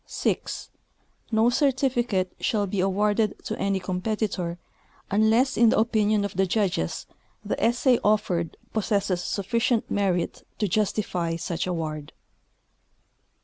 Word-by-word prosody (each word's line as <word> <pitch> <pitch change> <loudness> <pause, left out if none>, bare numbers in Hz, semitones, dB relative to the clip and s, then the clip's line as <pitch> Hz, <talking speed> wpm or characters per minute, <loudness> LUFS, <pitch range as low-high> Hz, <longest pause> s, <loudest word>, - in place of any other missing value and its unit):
6. - - -2 0.6
No 225 +2 +4
certificate 245 -8 +1
shall 215 -5 +1
be 195 0 -3
awarded 205 +3 +1
to - - -3
any 195 -1 +1
competitor 185 -1 -2 0.5
unless, 220 +6 +3
in 230 0 +6
the - - +2
opinion 215 -2 +2
of 200 - -5
the 190 +1 +2
judges, 185 - -1 0.4
the - - -2
essay 245 +1 +3
oflered 205 -6 +1 0.2
possesses 200 -4 0
suflicient 230 +5 0
merit 190 -4 0 0.2
to 210 - 0
justify 185 -4 0
such 170 +1 -3
award. 155 -4 -4
205 Hz, 115 wpm, -25 LUFS, 185-225 Hz, 0.6 s, in